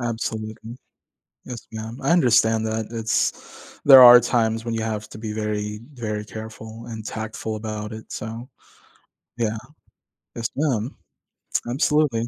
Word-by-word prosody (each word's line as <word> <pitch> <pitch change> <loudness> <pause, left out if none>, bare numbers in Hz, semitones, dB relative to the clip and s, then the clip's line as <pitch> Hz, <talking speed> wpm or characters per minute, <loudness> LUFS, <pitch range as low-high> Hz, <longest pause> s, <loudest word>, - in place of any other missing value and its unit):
Absolutely. 110 -1 -4 0.7
Yes, 120 -3 -8
ma'am, 110 +2 -6
I - - 0
understand 115 -8 +4
that, 110 0 -2
it's 115 -2 -3
there 135 -2 +10
are 120 0 +11
times 115 -1 0
when 115 - -2
you 110 - -2
have 110 -1 -3
to - - -10
be 110 -1 -5
very 105 -1 -3
very 105 -4 -4
careful 110 +1 -9
and 110 -2 -7
tactful 110 0 -5
about 105 0 -5
it, 110 0 -10
so 115 +3 -6 0.9
Yeah. 110 -1 0 0.8
Yes, 115 0 -2
ma'am. 130 -5 -1 0.7
Absolutely. 130 -3 +1
110 Hz, 130 wpm, -23 LUFS, 110-120 Hz, 0.9 s, are